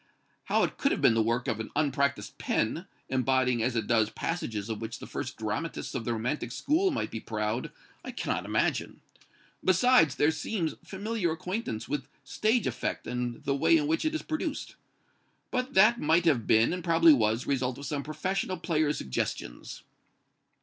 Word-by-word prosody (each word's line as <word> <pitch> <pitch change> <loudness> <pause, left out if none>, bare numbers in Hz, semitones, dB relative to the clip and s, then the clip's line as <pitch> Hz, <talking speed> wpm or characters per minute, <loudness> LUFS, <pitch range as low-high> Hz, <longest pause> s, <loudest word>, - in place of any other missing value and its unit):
How - - +2
it - - -2
could - - +2
have - - 0
been - - +5
the 115 - +3
work 120 +4 0
of 115 -4 -1
an 110 - -5
unpracticed 140 -1 0
pen, 160 +11 -1 0.2
embodying 130 -2 +1
as 120 +2 0
it 115 - 0
does 110 -2 +2
passages 110 -12 -3
of 110 -1 -4
which 115 0 -5
the - - -9
first - - -5
dramatists - - -3
of 115 - -3
the 120 - 0
romantic 120 +2 -2
school 320 - +1
might 290 - -2
be 115 - -4
proud, 110 +2 -3 0.3
I - - -7
cannot - - -2
imagine. - - -1 0.6
Besides, 190 - +4
there 150 - +3
seems 165 0 -2
familiar 200 -2 -2
acquaintance 160 - -4
with 145 -3 -3 0.2
stage 220 +2 +1
effect - - -2
and 125 -1 -3
the 140 - 0
way 330 - +4
in 300 - 0
which 320 +2 0
it 315 0 0
is 315 - -3
produced. 315 0 -3 0.8
But 255 +1 -2
that 215 +5 +6
might 165 +3 +3
have 130 -10 +2
been, 110 +7 +4
and 180 -1 -4
probably 165 -1 +6
was, 110 -1 +2
the - - -7
result 130 -2 0
of 140 - -8
some 145 0 -2
professional 185 +6 -2
player's 155 -3 0
suggestions." - - -4
140 Hz, 180 wpm, -29 LUFS, 115-185 Hz, 0.8 s, that